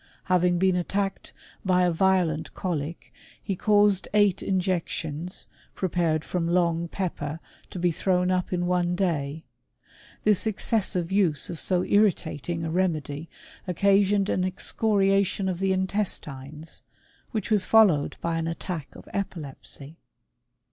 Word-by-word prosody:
Having 180 Hz, -1 st, +2 dB
been 185 Hz, 0 st, +3 dB
attacked 195 Hz, +2 st, -2 dB, 0.3 s
by 180 Hz, -1 st, +3 dB
a 175 Hz, -, +3 dB
violent 170 Hz, -3 st, +1 dB
colic, 165 Hz, -3 st, -4 dB, 0.3 s
he 195 Hz, -, -3 dB
caused 205 Hz, -1 st, +3 dB
eight 205 Hz, -3 st, +4 dB
injections, 180 Hz, -3 st, -2 dB, 0.3 s
prepared 170 Hz, -4 st, 0 dB
from 175 Hz, -2 st, -1 dB
long 170 Hz, -1 st, +1 dB
pepper, 160 Hz, -4 st, -4 dB, 0.3 s
to -, -, -8 dB
be 175 Hz, 0 st, +2 dB
thrown 180 Hz, +2 st, +1 dB
up 185 Hz, -1 st, 0 dB
in 175 Hz, -1 st, 0 dB
one 175 Hz, 0 st, +1 dB
day. 160 Hz, -5 st, -1 dB, 0.8 s
Tliis 210 Hz, 0 st, +3 dB
excessive 195 Hz, -4 st, 0 dB
use 180 Hz, -7 st, +2 dB
of 170 Hz, -, -6 dB
so 180 Hz, -1 st, +1 dB
irritating 170 Hz, -5 st, +1 dB
a 160 Hz, -, -2 dB
remedy, 160 Hz, -4 st, -1 dB, 0.4 s
occasioned 200 Hz, +2 st, +3 dB
an 185 Hz, -, 0 dB
excoriation 195 Hz, 0 st, +1 dB
of 180 Hz, -2 st, -2 dB
the 195 Hz, 0 st, +1 dB
intestines, 160 Hz, -6 st, -3 dB, 0.5 s
which 220 Hz, -1 st, -3 dB
was 210 Hz, -3 st, +3 dB
followed 190 Hz, -10 st, +4 dB
by 165 Hz, -1 st, -1 dB
an 165 Hz, -, -2 dB
attack 165 Hz, -2 st, -4 dB
of -, -, -13 dB
epilepsy. 155 Hz, -5 st, -6 dB
180 Hz, 125 wpm, -26 LUFS, 165-195 Hz, 0.8 s, eight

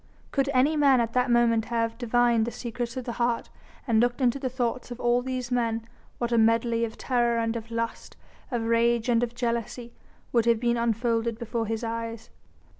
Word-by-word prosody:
Could 275 Hz, -1 st, +1 dB
any 275 Hz, +4 st, +3 dB
man 280 Hz, -4 st, +5 dB
at 230 Hz, -1 st, -1 dB
that 250 Hz, 0 st, +2 dB
moment 235 Hz, -2 st, +3 dB
have 230 Hz, -1 st, -1 dB
divined 240 Hz, -1 st, +2 dB
the -, -, -2 dB
secrets 240 Hz, +1 st, -5 dB
of 255 Hz, -, -4 dB
the 240 Hz, -, -3 dB
heart 235 Hz, -1 st, 0 dB, 0.4 s
and 225 Hz, -2 st, +3 dB
looked 240 Hz, +2 st, +1 dB
into 255 Hz, +1 st, +2 dB
the 260 Hz, -1 st, -2 dB
thoughts 250 Hz, -1 st, -2 dB
of 245 Hz, 0 st, -7 dB
all 240 Hz, 0 st, +2 dB
these 255 Hz, -1 st, -4 dB
men, 230 Hz, -2 st, 0 dB, 0.3 s
what 240 Hz, 0 st, -2 dB
a 235 Hz, -, +3 dB
medley 230 Hz, +1 st, +2 dB
of 225 Hz, -1 st, -4 dB
terror 240 Hz, -2 st, +1 dB
and 230 Hz, 0 st, 0 dB
of 230 Hz, -1 st, -6 dB
lust, 230 Hz, 0 st, -4 dB, 0.3 s
of 240 Hz, -4 st, -2 dB
rage 230 Hz, +1 st, +2 dB
and 235 Hz, -1 st, +3 dB
of 240 Hz, -1 st, -2 dB
jealousy, 235 Hz, 0 st, -3 dB, 0.4 s
would 235 Hz, -2 st, +2 dB
have 230 Hz, -1 st, +4 dB
been 240 Hz, 0 st, +1 dB
unfolded 230 Hz, 0 st, 0 dB
before 230 Hz, -1 st, -3 dB
his 225 Hz, +1 st, -3 dB
eyes. 230 Hz, 0 st, -5 dB
235 Hz, 195 wpm, -26 LUFS, 230-245 Hz, 0.4 s, man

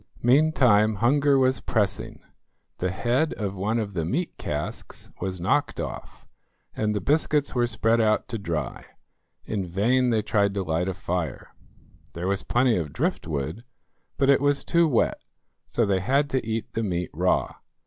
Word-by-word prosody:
Meantime 120 Hz, -6 st, +4 dB
hunger 140 Hz, +6 st, +3 dB
was 130 Hz, 0 st, +2 dB
pressing; 105 Hz, -2 st, -2 dB, 0.6 s
the 90 Hz, -, 0 dB
head 120 Hz, -, 0 dB
of 100 Hz, -3 st, -3 dB
one 100 Hz, +4 st, -1 dB
of 105 Hz, -3 st, -3 dB
the 85 Hz, -3 st, -1 dB
meat 155 Hz, -, -2 dB
casks 75 Hz, 0 st, -5 dB
was 95 Hz, 0 st, -3 dB
knocked 85 Hz, -, 0 dB
off, -, -, -7 dB, 0.5 s
and 105 Hz, -1 st, 0 dB
the -, -, 0 dB
biscuits 150 Hz, +2 st, +1 dB
were 120 Hz, -1 st, +2 dB
spread 115 Hz, 0 st, +2 dB
out 110 Hz, -1 st, +2 dB
to 115 Hz, -3 st, -4 dB
dry. 80 Hz, -8 st, -4 dB, 0.6 s
In 105 Hz, -3 st, -2 dB
vain 115 Hz, +9 st, +1 dB
they 110 Hz, -2 st, +1 dB
tried 100 Hz, -1 st, +1 dB
to 100 Hz, -, -1 dB
light 85 Hz, +1 st, -1 dB
a 95 Hz, -, -2 dB
fire. 90 Hz, -6 st, -4 dB, 0.6 s
There 85 Hz, +2 st, -3 dB
was 100 Hz, 0 st, 0 dB
plenty 120 Hz, -2 st, +2 dB
of 80 Hz, -5 st, -3 dB
driftwood, 80 Hz, -, -2 dB, 0.5 s
but 135 Hz, -, +2 dB
it 135 Hz, -, +3 dB
was 145 Hz, -1 st, +2 dB
too 170 Hz, -1 st, +3 dB
wet; 125 Hz, -7 st, +1 dB, 0.5 s
so 115 Hz, -, +1 dB
they 100 Hz, -2 st, +1 dB
had 140 Hz, +8 st, +1 dB
to 130 Hz, -, 0 dB
eat 115 Hz, 0 st, -4 dB
the 115 Hz, -, -1 dB
meat 90 Hz, -5 st, -2 dB
raw. -, -, 0 dB
110 Hz, 165 wpm, -25 LUFS, 95-130 Hz, 0.6 s, Meantime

